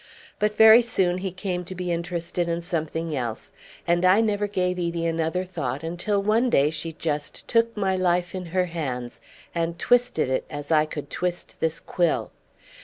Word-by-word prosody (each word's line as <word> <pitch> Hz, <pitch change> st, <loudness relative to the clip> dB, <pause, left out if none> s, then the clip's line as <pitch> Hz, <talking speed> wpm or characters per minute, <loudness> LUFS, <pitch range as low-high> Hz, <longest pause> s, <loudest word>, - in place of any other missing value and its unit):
But 210 Hz, 0 st, +1 dB
very 220 Hz, +2 st, +9 dB
soon 185 Hz, -6 st, 0 dB
he 190 Hz, 0 st, -3 dB
came 185 Hz, -1 st, -3 dB
to 185 Hz, -, -7 dB
be 180 Hz, -1 st, -3 dB
interested 170 Hz, 0 st, -2 dB
in 170 Hz, 0 st, -1 dB
something 165 Hz, -2 st, -3 dB
else, 120 Hz, -4 st, -4 dB, 0.3 s
and 175 Hz, +1 st, +2 dB
I 185 Hz, +3 st, +6 dB
never 210 Hz, -2 st, +1 dB
gave 180 Hz, -2 st, -1 dB
Edie 170 Hz, -1 st, -1 dB
another 165 Hz, +2 st, 0 dB
thought 140 Hz, -6 st, -4 dB
until 175 Hz, +5 st, -1 dB
one 225 Hz, +5 st, +3 dB
day 145 Hz, -7 st, +3 dB
she 160 Hz, +1 st, -3 dB
just 150 Hz, -2 st, -4 dB
took 230 Hz, -1 st, +2 dB
my 190 Hz, -2 st, +1 dB
life 175 Hz, -1 st, +1 dB
in 185 Hz, -2 st, -5 dB
her 180 Hz, +2 st, +1 dB
hands 130 Hz, -8 st, -5 dB, 0.3 s
and 170 Hz, 0 st, -1 dB
twisted 245 Hz, -, +2 dB
it 130 Hz, 0 st, -1 dB
as 145 Hz, 0 st, -6 dB
I 155 Hz, -1 st, +5 dB
could 150 Hz, -1 st, -7 dB
twist 175 Hz, +1 st, -3 dB
this 160 Hz, 0 st, -1 dB
quill. 175 Hz, -2 st, 0 dB
175 Hz, 180 wpm, -25 LUFS, 160-185 Hz, 0.3 s, very